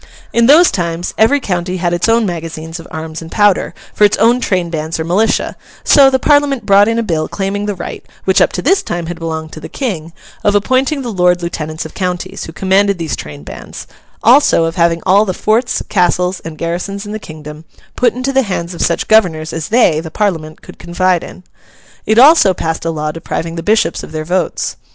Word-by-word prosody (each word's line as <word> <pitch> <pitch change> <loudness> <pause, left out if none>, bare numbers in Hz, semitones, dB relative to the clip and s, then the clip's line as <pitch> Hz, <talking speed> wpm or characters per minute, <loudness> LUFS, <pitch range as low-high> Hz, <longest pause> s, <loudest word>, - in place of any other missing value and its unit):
In 235 0 +3
those 325 +6 +6
times, 170 -1 -3
every 260 +7 +3
county 180 -5 -3
had 175 -1 -1
its 175 +6 0
own 230 0 +3
magazines 165 -2 -5
of 165 - -11
arms 160 0 -6
and 165 - -10
powder, 205 -2 +2 0.2
for - - +1
its 205 - +4
own 235 +2 +3
train 180 -6 -1
bands 160 0 -3
or - - -1
militia; 190 +7 0 0.3
so, 275 -2 +6
the 265 - +2
Parliament 285 -1 +2
brought 200 0 +5
in 230 0 0
a 230 - 0
bill 160 -6 -1
claiming 205 +1 -3
the 205 - -2
right 175 - -7 0.2
(which 190 - +3
up - - +3
to - - -3
this 380 +7 +3
time 175 -1 -4
had 175 +1 -6
belonged 160 -1 -5
to - - -9
the - - -9
King) 175 - -4 0.3
of 205 0 +2
appointing 260 +7 +1
the 235 -3 -4
Lord 180 -1 +2
Lieutenants 160 -2 -4
of 160 - -9
counties, 180 -2 -4
who - - -8
commanded 195 +3 +1
these 165 -2 -3
train 75 -1 -9
bands; - - -9 0.4
also, 245 - +5
of 165 +1 -3
having 170 -1 +1
all 195 +3 +5
the 185 -4 -3
forts, 235 +4 0
castles, 180 -1 +1
and 160 -1 -9
garrisons 180 +5 -4
in 205 - -7
the 215 - -4
kingdom, 155 -3 -10 0.3
put 240 -2 +1
into 255 +2 -2
the 270 - +4
hands 185 -6 -4
of 170 - -6
such 170 - 0
governors 165 -8 +2
as 160 -1 -4
they, 220 -9 +3
the 160 0 -7
Parliament, 160 -5 -3
could - - -13
confide 175 0 0
in. 185 - -11 0.6
It 220 - +2
also 260 - +6
passed 160 0 -3
a - - 0
law 155 -1 -2
depriving 165 +1 -5
the 165 - -4
Bishops 215 +5 +1
of - - -11
their 155 0 -4
votes. 180 0 -2
180 Hz, 215 wpm, -15 LUFS, 165-215 Hz, 0.6 s, those